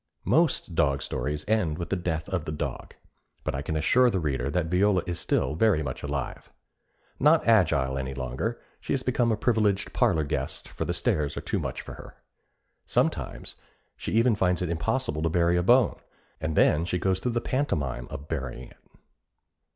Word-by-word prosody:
Most 155 - +2
dog 70 -4 +1
stories 75 +1 -3
end 100 -9 +1
with 85 - -5
the - - +2
death 80 -3 -2
of 95 -5 -2
the - - -3
dog, 75 - -5 0.5
but 75 - -2
I 65 - -2
can 80 +2 -3
assure 125 +11 +4
the 95 - 0
reader 70 -5 -1
that 85 +3 0
Viola 90 +2 +2
is 90 -2 -3
still 75 - 0
very 85 -2 +3
much 65 -3 -5
alive. 70 -2 -4 0.7
Not 155 0 +4
agile 70 -12 +3
any 65 0 -4
longer, 65 - -3 0.2
she - - -3
has 135 -2 -1
become 120 -2 +1
a 110 - +1
privileged 105 -3 +1
parlor 80 - +2
guest, 70 - -4
for - - -4
the - - -1
stairs 75 -1 0
are - - -2
too - - -2
much - - -4
for - - -9
her. - - -12 0.7
Sometimes - - -1 0.4
she - - -5
even 115 +2 +4
finds 90 -3 +1
it 90 - -2
impossible 85 0 -1
to 80 - +1
bury 85 +1 +2
a 90 - +3
bone, 120 +6 +4 0.4
and 80 0 -2
then 80 +2 +4
she 90 +1 -1
goes 95 +1 +1
through 125 +4 -2
the 120 - +1
pantomime 70 - -2
of 70 +2 -8
burying 65 -5 -5
it. - - -20
85 Hz, 190 wpm, -27 LUFS, 75-110 Hz, 0.7 s, assure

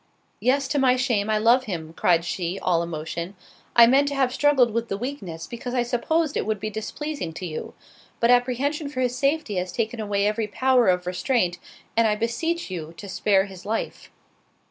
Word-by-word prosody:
"Yes, 270 +2 +2
to 290 - +1
my 255 -2 +4
shame 235 -5 0
I 215 - +2
love 235 +4 +4
him:" 165 -6 -5
(cried 170 -1 +2
she, 175 +1 -3
all 170 -2 +1
emotion) 170 +3 -5 0.4
"I 235 - +9
meant 270 +4 +4
to 285 - -2
have 260 -2 +1
struggled 265 -5 +3
with 230 +1 -1
the 195 - -3
weakness, 200 - -5
because 245 +1 -6
I 245 - +2
supposed 295 +6 0
it - - -1
would 215 -2 -1
be 215 +2 -4
displeasing 220 - -5
to 175 +3 -6
you—but 180 +7 -4
apprehension 265 +5 +1
for 255 -3 -3
his 250 -1 0
safety 275 -5 0
has 180 0 -2
taken 225 +4 -2
away 205 -2 0
every 215 +1 0
power 255 +3 +3
of 180 -1 +2
restraint, 180 0 0 0.4
and 230 0 +4
I 210 - +2
beseech 240 - -2
you 165 -2 -6
to 200 - -8
spare 195 0 +2
his 190 -2 -11
life." 220 +2 -4
230 Hz, 190 wpm, -24 LUFS, 185-255 Hz, 0.4 s, I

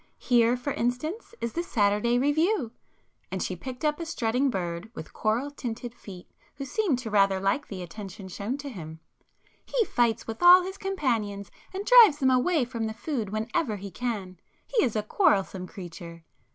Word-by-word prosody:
Here, 240 0 +3
for 270 +3 -3
instance, 310 - -3
is 235 - -2
the 340 - -1
'Saturday 215 -4 +1
Review'"—and 290 - -2
she 185 - -3
picked 255 - -6
up 300 +1 +1
a 335 - -4
strutting 250 -1 0
bird 175 -2 -3
with - - -9
coral 235 +6 0
tinted 240 -3 -6
feet, 185 -6 -11 0.3
who 275 - -5
seemed 340 - 0
to 240 -3 -6
rather 195 -2 +3
like 195 +9 0
the 185 -3 -6
attention 195 +2 -9
shown 205 +8 -4
to 285 0 -7
him—"He 170 - -6
fights 235 - +1
with 225 0 -6
all 355 +1 +9
his 380 +2 -6
companions 230 - -2 0.2
and 390 +2 -5
drives 460 -11 +8
them 265 -3 +3
away 260 +3 +2
from 230 -2 -3
the 220 - -5
food 235 -4 -3
whenever 220 - -1
he 200 0 -8
can. 200 -7 -4 0.3
He - - +1
is 240 -5 0
a 215 - 0
quarrelsome 195 - +1
creature!" 170 -3 -10
235 Hz, 170 wpm, -27 LUFS, 200-290 Hz, 0.3 s, all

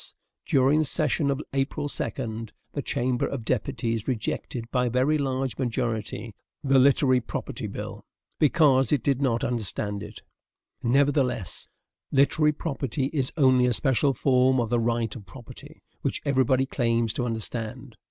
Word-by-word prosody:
During 135 +3 +4
the 155 - +2
session 145 +1 0
of 140 +1 -1
April 140 +2 -1
2, 115 -5 -4 0.3
the - - -2
Chamber 125 0 0
of 125 -5 -5
Deputies 115 -3 -1
rejected, 120 -1 -3
by 125 -1 +1
a - - 0
very 130 +6 +2
large 135 -2 -2
majority, 115 -2 -2 0.3
the 135 -1 +4
literary 130 -1 +4
property 115 - -5
bill, - - -7 0.4
BECAUSE 140 -2 +4
IT 140 -6 +2
DID 140 -1 +1
NOT 120 -4 +1
UNDERSTAND 105 -3 -2
IT. 105 +1 -10 0.6
Nevertheless, 130 - +1 0.4
literary 150 +2 +3
property 135 -3 -3
is 135 -4 0
only 130 -3 +5
a 125 - +2
special 135 +2 +2
form 130 0 +3
of 115 -1 -1
the 120 - +3
right 115 -2 0
of 100 -5 -10
property, 120 +5 -13 0.2
which - - -2
everybody 130 -1 +2
claims 115 -4 0
to 125 - -2
understand. 115 -1 -5
130 Hz, 145 wpm, -26 LUFS, 115-140 Hz, 0.6 s, only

